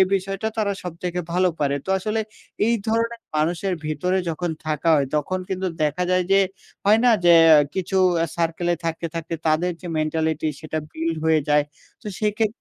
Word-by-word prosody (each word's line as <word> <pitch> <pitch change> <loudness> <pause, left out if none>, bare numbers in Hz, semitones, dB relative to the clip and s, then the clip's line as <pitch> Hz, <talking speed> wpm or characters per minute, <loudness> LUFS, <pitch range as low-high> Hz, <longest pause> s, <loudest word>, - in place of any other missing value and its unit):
বিষয়টা 195 +3 -2
তারা 205 -2 +1
সবথেকে 180 0 -4
ভালো 180 +1 +3
পারে। 140 -1 +1
তো - - -16
আসলে 215 +3 -1 0.5
এই 235 - +3
ধরনের 230 +1 0
মানুষের 175 +4 0
ভিতরে 180 +5 0
যখন 170 +2 -2 0.2
থাকা 155 +1 -1
হয়, 140 -2 +1
তখন 170 +5 -1
কিন্তু 190 0 -2 0.2
দেখা 150 +4 0
যায় 185 -1 +2
যে, 195 - +6 0.4
হয় 210 +2 +5
না? 245 - +6
যে 175 - +7 0.2
অ্যা 150 -2 +8
কিছু 190 0 -2 0.3
আ - - -2
সার্কেলে 170 +1 0
থাকতে, 165 0 -2
থাকতে 165 0 -4
তাদের 165 +3 +2
যে 180 - -9
মেন্টালিটি 155 0 0
সেটা 155 0 -4
বিল্ড 165 0 -2
হয়ে 160 -1 +4
যায়। 150 0 +4 0.4
তো - - -11 0.2
সেক্ষে 210 +1 +2
175 Hz, 175 wpm, -23 LUFS, 160-195 Hz, 0.5 s, অ্যা